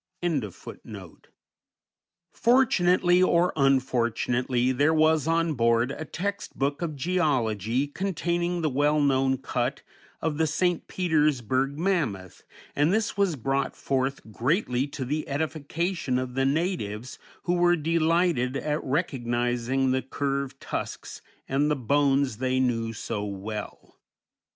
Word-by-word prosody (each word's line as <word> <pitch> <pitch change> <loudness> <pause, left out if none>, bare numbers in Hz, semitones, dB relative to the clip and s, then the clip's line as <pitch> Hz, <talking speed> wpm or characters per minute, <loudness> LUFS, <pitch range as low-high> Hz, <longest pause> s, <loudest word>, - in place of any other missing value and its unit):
_ 140 - -5 1.1
Fortunately, 185 -8 +3
or 180 -1 +3
unfortunately, 125 -2 +1
there 145 +5 +2
was 155 -1 +3
on 165 0 +2
board 115 0 +2
a 155 - -6
text 200 +6 -4
book 140 +3 -1
of 165 -3 -3
geology 130 - 0
containing 175 +1 -2
the 155 - +2
well 145 +3 +2
known 135 -2 +2
cut 130 +1 -2 0.4
of 155 -1 -2
the 160 - +3
St. 175 +3 0
Petersburg 140 - +1
mammoth, 145 - -1 0.3
and 145 +4 +3
this 220 +1 0
was 200 -5 +1
brought 135 +2 -1
forth, 135 0 -1
greatly 130 - 0
to 140 -2 -5
the 150 +4 -2
edification 155 0 -2
of 130 -1 -3
the 135 +1 +1
natives, 135 - -2 0.2
who 175 - 0
were 175 0 +4
delighted 165 -4 +1
at 150 +2 -2
recognizing 125 -3 0
the 130 0 +1
curved 140 0 -3
tusks - - -5 0.3
and 140 +2 +1
the 150 - +2
bones 140 -1 +1
they 130 +1 0
knew 115 -3 0
so 105 -1 -4
well. 105 +1 -7
140 Hz, 120 wpm, -26 LUFS, 125-165 Hz, 1.1 s, were